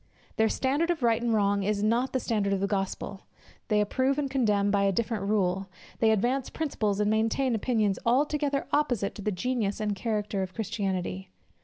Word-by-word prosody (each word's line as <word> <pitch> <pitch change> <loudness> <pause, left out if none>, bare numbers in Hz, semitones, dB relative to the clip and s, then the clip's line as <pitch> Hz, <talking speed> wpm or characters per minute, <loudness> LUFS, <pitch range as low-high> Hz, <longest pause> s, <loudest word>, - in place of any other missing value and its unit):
Their 220 0 +3
standard 285 +9 0
of 330 -6 -1
right 230 -1 +3
and 235 -1 0
wrong 200 -2 +2
is 205 +1 0
not 235 +4 +1
the 260 - 0
standard 210 -4 0
of 195 - 0
the 200 - +1
gospel: 195 0 -3 0.4
they 210 -2 +2
approve 260 +6 +1
and 280 -2 -1
condemn 210 -6 +2
by 200 0 +2
a 200 0 +3
different 215 0 -1
rule; 195 -2 0 0.3
they 225 - +4
advance 245 +5 +1
principles 215 -10 -1
and 210 0 +2
maintain 225 +4 +1
opinions 215 -4 +1
altogether 280 +3 +1
opposite 245 -9 +1
to - - -9
the 210 - -1
genius 215 +1 -1
and 210 -1 -1
character 210 -1 -2
of 190 0 -5
Christianity. 190 -3 -3
215 Hz, 185 wpm, -28 LUFS, 200-250 Hz, 0.4 s, they